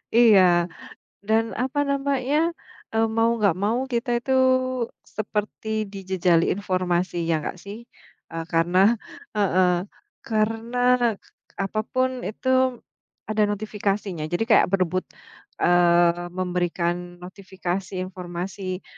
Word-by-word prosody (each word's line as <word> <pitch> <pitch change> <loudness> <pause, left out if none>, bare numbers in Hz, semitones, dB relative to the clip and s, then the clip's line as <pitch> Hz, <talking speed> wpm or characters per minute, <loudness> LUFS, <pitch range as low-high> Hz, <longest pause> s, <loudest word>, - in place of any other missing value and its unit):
Iya, 185 -7 +6 0.6
dan 220 +2 +2 0.2
apa 265 +3 -2
namanya, 275 0 0 0.6
eee, 225 0 +2
mau 225 +1 +4
nggak 200 -4 +3
mau 225 +4 +1
kita 235 +2 -1
itu 265 - -2 0.8
seperti 215 0 -3 0.2
dijejali 185 -3 +1
informasi, 185 -2 -1
ya 165 - +2
nggak 150 - -5
sih? 200 +1 -7 0.5
Eee, 165 -1 -5
karena 170 +2 +2 0.6
heeh, 185 -3 +3 0.6
karena 225 +2 -1 0.4
k - - -35 0.4
apa 215 +2 -2
pun 255 0 +2 0.2
itu 220 +5 -5 0.8
ada 215 0 +1
notifikasinya. 200 -4 -2
Jadi 175 +6 +1
kayak 215 - +6
berebut, 185 -1 +1 0.6
eee, 175 0 +4
memberikan 175 -1 0 0.3
notifikasi 190 0 -5
informasi 185 +1 -6
195 Hz, 105 wpm, -24 LUFS, 175-220 Hz, 0.8 s, Iya